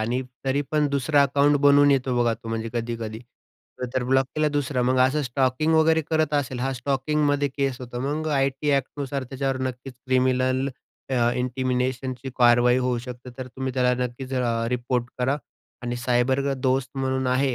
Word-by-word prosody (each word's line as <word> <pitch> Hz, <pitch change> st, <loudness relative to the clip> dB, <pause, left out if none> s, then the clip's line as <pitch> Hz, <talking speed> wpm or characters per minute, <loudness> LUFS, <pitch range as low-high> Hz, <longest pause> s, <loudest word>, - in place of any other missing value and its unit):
आणि 120 Hz, +4 st, 0 dB, 0.2 s
तरी 135 Hz, +1 st, +1 dB
पण 150 Hz, -1 st, +2 dB
दुसरं 140 Hz, +1 st, +1 dB
अकाउंट 140 Hz, +1 st, +3 dB
बनवून 145 Hz, 0 st, +6 dB
येतो 130 Hz, -2 st, +1 dB
बघा 120 Hz, -1 st, +3 dB
तो 115 Hz, -, -11 dB
म्हणजे 115 Hz, 0 st, -3 dB
कधी-कधी. 115 Hz, -2 st, -3 dB, 0.8 s
तर 130 Hz, -, +1 dB
ब्लॉक 130 Hz, +1 st, +2 dB
केला 155 Hz, 0 st, +2 dB
दुसरा, 145 Hz, -3 st, -1 dB
मग 130 Hz, +1 st, +2 dB
असं 150 Hz, +3 st, 0 dB
स्टॉकिंग 130 Hz, +4 st, +1 dB
वगैरे 160 Hz, 0 st, +4 dB
करत 155 Hz, -1 st, +1 dB
असेल 135 Hz, -3 st, -1 dB
हां, 135 Hz, +2 st, -1 dB
स्टॉकिंगमध्ये 145 Hz, +2 st, 0 dB
केस 135 Hz, -1 st, -2 dB
होतो. 120 Hz, -1 st, -6 dB
मग 150 Hz, +4 st, -2 dB
आय-टी 135 Hz, +1 st, 0 dB
एक्ट 135 Hz, -2 st, -1 dB
नुसार 140 Hz, -1 st, -3 dB
त्याच्यावर 135 Hz, +1 st, -2 dB
नक्कीच 130 Hz, +1 st, -8 dB
क्रिमिनल 130 Hz, +1 st, +2 dB, 0.4 s
अ, 120 Hz, -2 st, +2 dB
इंटिमेशनची 130 Hz, 0 st, -2 dB
कारवाई 120 Hz, 0 st, +5 dB
होऊ 125 Hz, -1 st, 0 dB
शकते. 125 Hz, +1 st, -9 dB
तर 130 Hz, -, -5 dB
तुम्ही 130 Hz, +1 st, -5 dB
त्याला 125 Hz, -1 st, +3 dB
नक्कीच 130 Hz, +2 st, -6 dB
अ, 115 Hz, -2 st, 0 dB
रिपोर्ट 125 Hz, 0 st, -1 dB
करा. 130 Hz, +3 st, +1 dB, 0.5 s
आणि 120 Hz, 0 st, -3 dB
सायबर 125 Hz, +2 st, +1 dB
दोस्त 130 Hz, 0 st, 0 dB
म्हणून 130 Hz, 0 st, -1 dB
आहे 130 Hz, +1 st, +1 dB
130 Hz, 170 wpm, -24 LUFS, 125-140 Hz, 0.8 s, बनवून